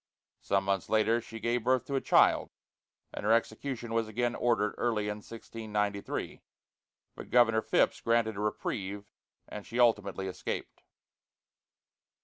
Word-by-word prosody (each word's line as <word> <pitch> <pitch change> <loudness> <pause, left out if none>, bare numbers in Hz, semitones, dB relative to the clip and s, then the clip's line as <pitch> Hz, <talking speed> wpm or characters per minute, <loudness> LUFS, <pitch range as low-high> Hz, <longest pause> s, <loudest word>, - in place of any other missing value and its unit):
Some 100 0 0
months 95 -1 -1
later 110 +2 +3
she 115 0 -9
gave 120 +1 0
birth 130 0 +2
to 140 - -5
a 135 - +1
child, - - +4 0.6
and - - -6
her 105 - +2
execution 115 +1 -1
was 115 -1 +1
again 120 +2 -1
ordered 115 -4 +1
early 110 -3 0
in 105 - -3
1693, 105 -2 -4 0.7
but - - -10
Governor 115 -3 +4
Phips - - +1
granted 115 -2 +1
a - - -6
reprieve, 105 -1 -3 0.4
and 105 - -7
she 120 +4 -5
ultimately 105 -5 +2
escaped. 95 - -5
110 Hz, 135 wpm, -30 LUFS, 105-120 Hz, 0.7 s, child